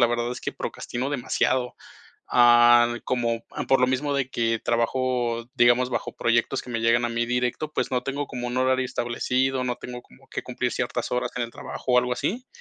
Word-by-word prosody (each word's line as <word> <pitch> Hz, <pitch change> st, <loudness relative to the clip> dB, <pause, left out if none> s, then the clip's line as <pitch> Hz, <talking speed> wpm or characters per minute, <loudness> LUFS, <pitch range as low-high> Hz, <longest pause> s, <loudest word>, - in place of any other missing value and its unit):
la 120 Hz, -, +6 dB
verdad 120 Hz, +1 st, -1 dB
es -, -, -7 dB
que -, -, -4 dB
procrastino 130 Hz, +3 st, -4 dB
demasiado. 130 Hz, -1 st, 0 dB, 0.5 s
Ah, 120 Hz, 0 st, +6 dB
como 115 Hz, -2 st, -1 dB, 0.3 s
por 135 Hz, -, +4 dB
lo 125 Hz, -, +5 dB
mismo 135 Hz, +3 st, 0 dB
de 135 Hz, -2 st, -1 dB
que 115 Hz, -2 st, 0 dB
trabajo, 120 Hz, 0 st, 0 dB
digamos, 120 Hz, +1 st, +4 dB
bajo 120 Hz, -2 st, -3 dB
proyectos 120 Hz, +3 st, +1 dB
que 125 Hz, -, -10 dB
me 115 Hz, -1 st, -2 dB
llegan 115 Hz, +1 st, +3 dB
a -, -, +1 dB
mí 120 Hz, 0 st, -1 dB
directo, 125 Hz, +5 st, -1 dB
pues, -, -, -1 dB
no 125 Hz, -1 st, 0 dB
tengo 140 Hz, +1 st, -3 dB
como 125 Hz, -2 st, -5 dB
un 120 Hz, -, -4 dB
horario 130 Hz, 0 st, +2 dB
establecido. 125 Hz, +2 st, -1 dB
No 125 Hz, -1 st, -2 dB
tengo 125 Hz, 0 st, -8 dB
como 65 Hz, -, -21 dB
que -, -, -4 dB
cumplir -, -, -3 dB
ciertas -, -, -2 dB
horas 125 Hz, 0 st, 0 dB
en 125 Hz, -, 0 dB
el 115 Hz, -, -8 dB
trabajo 125 Hz, -, -5 dB
o 125 Hz, -, +6 dB
algo 125 Hz, 0 st, +1 dB
así. 240 Hz, -, -2 dB
125 Hz, 205 wpm, -25 LUFS, 120-130 Hz, 0.5 s, la